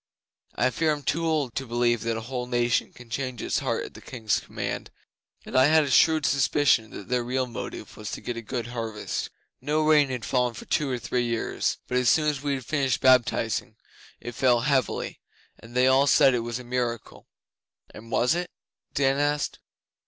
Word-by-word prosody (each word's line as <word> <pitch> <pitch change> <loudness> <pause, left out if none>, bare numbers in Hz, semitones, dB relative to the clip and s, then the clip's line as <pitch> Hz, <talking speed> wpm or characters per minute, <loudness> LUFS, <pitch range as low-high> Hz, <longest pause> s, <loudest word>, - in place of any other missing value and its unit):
I 130 +1 +2
fear 155 +6 +1
I'm 145 -1 -3
too 165 +3 0
old 150 -7 0
to 135 +2 -4
believe 120 -1 +1
that 115 -1 -1
a - - -4
whole 125 +1 -4
nation 120 -1 +1
can 120 -2 -15
change 130 -1 -3
its - - -1
heart - - -2
at - - -11
the - - -12
King's 110 -4 -1
command, - - -5 0.6
and - - -8
I 130 0 +6
had 155 +2 +5
a 140 - -3
shrewd 160 0 +4
suspicion 135 -4 +2
that 100 - -9
their 125 -1 0
real 130 +2 -1
motive 120 -2 -7
was 105 -1 -7
to - - -5
get 120 - -4
a 115 - -5
good 120 +1 -4
harvest. 115 -3 -4 0.3
No 155 +1 0
rain 150 -2 +4
had 125 -5 -4
fallen 125 +2 0
for - - -9
two 150 -2 0
or 125 - -1
three 120 +1 -1
years, 115 -1 -1
but 125 - 0
as 125 -2 +3
soon 155 -1 +3
as 145 -2 -3
we 140 -1 -1
had 130 -3 -7
finished 135 -3 0
baptizing, 130 -2 +2 0.4
it 120 - -7
fell 125 -2 +3
heavily, 130 -2 0 0.4
and 115 +2 -14
they 125 0 +4
all 135 +2 +4
said 135 -1 +6
it 125 - +1
was 115 0 -4
a 125 - -8
miracle.' 120 -2 -4 0.7
'And 115 +2 -12
was 120 +3 +2
it?' 175 +1 -2 0.5
Dan 135 0 +2
asked. 145 0 0
125 Hz, 205 wpm, -26 LUFS, 120-140 Hz, 0.7 s, I